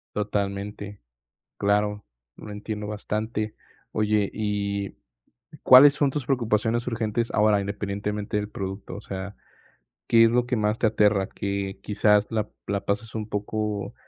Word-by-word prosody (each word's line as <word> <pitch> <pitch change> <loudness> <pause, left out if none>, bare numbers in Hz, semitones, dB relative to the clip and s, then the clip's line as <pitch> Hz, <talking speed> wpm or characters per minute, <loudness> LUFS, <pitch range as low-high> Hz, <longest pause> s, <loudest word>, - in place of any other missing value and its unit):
Totalmente, 100 0 -3 0.6
claro, 105 0 +1 0.3
lo 105 - -9
entiendo 105 0 -5
bastante. 105 +1 -3 0.4
Oye 105 -1 +1
y, 100 -2 -2 0.7
¿cuáles 140 +3 +9
son 145 -2 +2
tus 145 -3 -3
preocupaciones 115 -2 0
urgentes 115 0 -1
ahora?, 105 -1 +3
independientemente 100 +1 -3
del 105 0 -2
producto, 95 0 -6
o - - -7
sea, 95 +1 -6 0.7
¿qué 115 0 +6
es 115 - +3
lo 125 0 +2
que 125 0 -1
más 105 +1 0
te 110 - +3
aterra?, 105 -2 +3
que 100 -1 -3
quizás 105 0 +3
la 110 -1 -1 0.2
la 100 0 -2
pases 105 +2 -2
un 110 -1 -3
poco 105 0 -3
105 Hz, 135 wpm, -25 LUFS, 100-110 Hz, 0.7 s, cuáles